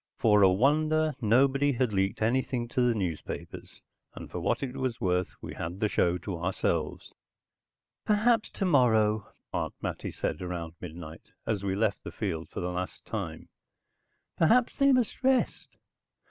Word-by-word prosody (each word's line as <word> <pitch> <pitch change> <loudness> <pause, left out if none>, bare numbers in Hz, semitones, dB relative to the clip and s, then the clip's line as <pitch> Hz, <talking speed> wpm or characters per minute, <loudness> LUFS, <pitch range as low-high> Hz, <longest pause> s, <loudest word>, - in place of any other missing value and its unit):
For 105 -2 +4
a 95 -1 +7
wonder, 155 +8 +2
nobody 135 +5 +3
had 125 -3 0
leaked 95 +2 0
anything 120 +1 0
to 125 - 0
the 120 -2 +3
newspapers, 90 -7 -5 0.3
and - - -9
for - - -4
what - - 0
it 130 -1 -4
was 130 -2 -2
worth, 90 -4 0
we - - -6
had 85 +4 -5
the 105 - +2
show 90 -3 +1
to 90 -1 -5
ourselves. 85 -3 -2 0.9
"Perhaps 220 +2 +3
tomorrow," 110 - +2 0.2
Aunt - - -2
Mattie - - -4
said - - -3
around 85 -3 -4
midnight, 80 -2 -9 0.2
as 105 -3 -1
we 95 -1 -1
left 105 -1 0
the - - -7
field 85 -6 -4
for - - -5
the 90 0 -2
last 90 +1 -5
time. - - -5 0.9
"Perhaps 235 +9 +4
they 275 -1 +5
must 250 -4 +1
rest." 260 -1 +2
110 Hz, 155 wpm, -29 LUFS, 90-140 Hz, 0.9 s, a